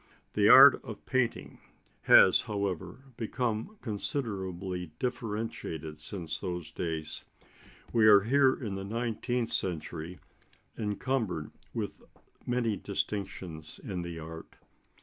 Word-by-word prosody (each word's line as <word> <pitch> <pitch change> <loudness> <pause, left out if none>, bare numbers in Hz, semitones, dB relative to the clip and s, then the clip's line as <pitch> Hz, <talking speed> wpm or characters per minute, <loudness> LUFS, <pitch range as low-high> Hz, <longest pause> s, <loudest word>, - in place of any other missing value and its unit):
The - - +4
art - - +9
of - - -9
painting 130 -2 -1 0.4
has, 95 - +7
however, 100 +2 -4
become 120 - -2
considerably 95 - -2
differentiated 110 - -4
since 80 0 -5
those 90 -2 -3
days. 80 -3 -4 0.7
We 110 -2 +5
are 100 -2 +8
here 130 +4 +4
in 110 -7 -5
the 95 0 -4
nineteenth 115 +2 -2
century 85 -1 -3 0.6
encumbered 105 - -2 0.2
with - - -4 0.5
many 120 -4 0
distinctions 95 -5 -4
in 90 -3 -5
the 85 -1 -6
art. 80 0 -9
100 Hz, 105 wpm, -30 LUFS, 85-115 Hz, 0.7 s, art